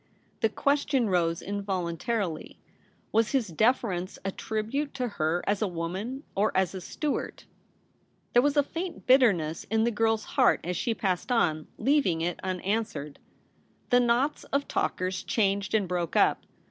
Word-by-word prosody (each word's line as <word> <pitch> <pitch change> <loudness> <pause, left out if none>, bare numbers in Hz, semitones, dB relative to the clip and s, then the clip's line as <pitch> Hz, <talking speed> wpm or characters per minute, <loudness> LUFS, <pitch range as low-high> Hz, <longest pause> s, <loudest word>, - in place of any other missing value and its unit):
The 225 - +2
question 280 -3 +1
rose 170 -1 +1
involuntarily 195 -1 -3 0.3
— - - -37
was 225 +2 +2
his 250 -7 +1
deference 190 -2 0
a 195 - 0
tribute 220 +9 -3
to 250 -2 -1
her 175 -4 -1
as 205 +1 0
a 215 - +2
woman 190 - -4
or 205 +2 +2
as 190 -2 +2
a 190 - -6
Stuart? 295 - -3 0.9
There 245 - +6
was 290 +2 +1
a 290 - +6
faint 335 +5 -6
bitterness 200 - +3
in 220 0 +1
the 235 - +2
girl's 225 0 +1
heart - - +3
as 180 +1 -2
she 230 +4 -1
passed 190 +4 -1
on, 160 -10 +1
leaving 255 - +2
it 175 +1 -2
unanswered. 185 -5 -3 0.7
The 245 - +6
knots 245 +4 +1
of 280 +1 -1
talkers 185 0 -1
changed 200 -1 0
and 205 -3 +2
broke 175 -2 -2
up. - - +3
210 Hz, 155 wpm, -28 LUFS, 180-245 Hz, 0.9 s, There